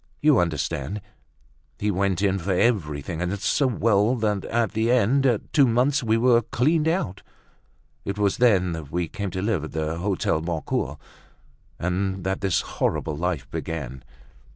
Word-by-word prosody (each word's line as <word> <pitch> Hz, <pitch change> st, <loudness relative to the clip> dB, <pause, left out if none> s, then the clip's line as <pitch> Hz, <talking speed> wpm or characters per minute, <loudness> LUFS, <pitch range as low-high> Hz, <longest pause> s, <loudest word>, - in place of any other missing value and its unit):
You 150 Hz, -2 st, +4 dB
understand, 80 Hz, +2 st, -2 dB, 0.8 s
he 105 Hz, 0 st, 0 dB
went 95 Hz, 0 st, 0 dB
in 95 Hz, -1 st, +2 dB
for 95 Hz, +2 st, -1 dB
everything, 85 Hz, -, 0 dB
and 90 Hz, +3 st, -1 dB
so 140 Hz, +7 st, +2 dB
well 110 Hz, -1 st, +2 dB
that 105 Hz, -4 st, -1 dB
at 115 Hz, -1 st, 0 dB
the 110 Hz, +2 st, 0 dB
end 125 Hz, +3 st, +3 dB
of 120 Hz, -5 st, -1 dB
two 140 Hz, -3 st, +5 dB
months 130 Hz, +5 st, +2 dB
we 110 Hz, -2 st, +2 dB
were 120 Hz, 0 st, +4 dB
cleaned 150 Hz, +8 st, +1 dB
out. 160 Hz, -, -1 dB, 0.8 s
It 100 Hz, +1 st, -4 dB
was 100 Hz, -2 st, +1 dB
then 100 Hz, -7 st, +3 dB
that 80 Hz, -4 st, -6 dB
we 85 Hz, +1 st, -1 dB
came 100 Hz, +4 st, -4 dB
to 95 Hz, +1 st, -4 dB
live 105 Hz, -7 st, 0 dB
at 80 Hz, -, -7 dB
the 80 Hz, +1 st, -2 dB
Hotel 90 Hz, -4 st, 0 dB
Boncoeur, 80 Hz, -3 st, -2 dB, 0.8 s
and 95 Hz, +2 st, -2 dB
that 95 Hz, 0 st, -2 dB
this 95 Hz, -4 st, +1 dB
horrible 80 Hz, -, -2 dB
life 85 Hz, -2 st, -2 dB
began." 65 Hz, -6 st, -5 dB
100 Hz, 160 wpm, -24 LUFS, 85-115 Hz, 0.8 s, two